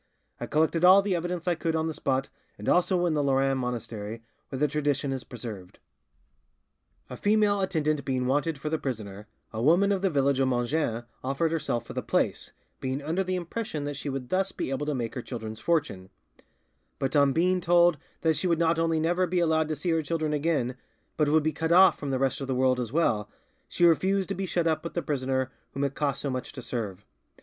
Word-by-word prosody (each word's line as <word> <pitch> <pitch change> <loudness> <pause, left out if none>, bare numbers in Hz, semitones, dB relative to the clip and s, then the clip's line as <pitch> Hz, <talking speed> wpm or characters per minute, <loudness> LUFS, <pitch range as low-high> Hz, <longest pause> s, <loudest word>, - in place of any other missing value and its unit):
I - - -4
collected 160 +2 +1
all 190 +2 +8
the 195 -2 0
evidence 175 0 -3
I 175 - +4
could 165 -1 -2
on 160 0 0
the 160 - -2
spot, 135 -2 -1 0.3
and - - -8
also 180 0 +3
in 170 - +1
the 150 - +1
Lerins 135 -1 +2
monastery, 115 -3 -5 0.3
where 135 - -5
the 150 +3 +2
tradition 145 -2 -1
is 130 -2 -5
preserved. 105 -7 -8 1.3
"A - - -7
female 205 -1 +2
attendant 155 -6 0
being 130 -1 -1
wanted 145 +4 0
for 150 +2 -4
the 160 - 0
prisoner, 105 -5 -5 0.3
a 110 - -3
woman 175 +9 +4
of 195 -2 0
the 195 - +2
village 140 -3 +2
of 135 - +3
Mongin 120 -1 0 0.2
offered 140 +5 0
herself 120 -8 -1
for - - -8
the - - -2
place, - - -1 0.3
being 130 +1 -2
under 160 +6 -1
the 185 0 -2
impression 180 -2 -4
that 145 0 -4
she 140 +1 -5
would 135 -2 -5
thus 190 +1 +1
be - - -4
able 145 +2 -2
to 150 - 0
make 120 -2 -3
her 125 - -4
children's 110 -3 -7
fortune; 110 - -1 0.9
but 135 +2 -2
on 140 -1 +5
being 180 +5 +2
told 175 -2 +4 0.2
that 160 -1 +2
she 185 - -1
would 170 -2 +2
not 165 0 +2
only 165 -1 +1
never 175 +3 +1
be 180 +1 -1
allowed 160 -2 +2
to 155 - -2
see 160 +4 -2
her 165 -1 +2
children 155 -1 -2
again, 145 -5 0 0.4
but 150 -2 +2
would 155 0 +3
be 155 0 0
cut 160 0 -2
off 185 +2 +6
from 145 - -4
the 135 - 0
rest 135 +1 0
of 135 - -4
the 130 - -1
world 130 0 +2
as 120 -3 -3
well, 110 -9 +1 0.4
she 175 - +2
refused 190 +3 +3
to - - 0
be 195 -1 -3
shut 175 -1 0
up 160 -1 +1
with 170 - -7
a - - +2
prisoner 130 -2 -1 0.2
whom 140 - -1
it 140 -1 0
cost 140 -2 -1
so 140 - -2
much 130 0 -4
to 130 - -8
serve. 105 -6 -5
150 Hz, 225 wpm, -27 LUFS, 130-170 Hz, 1.3 s, all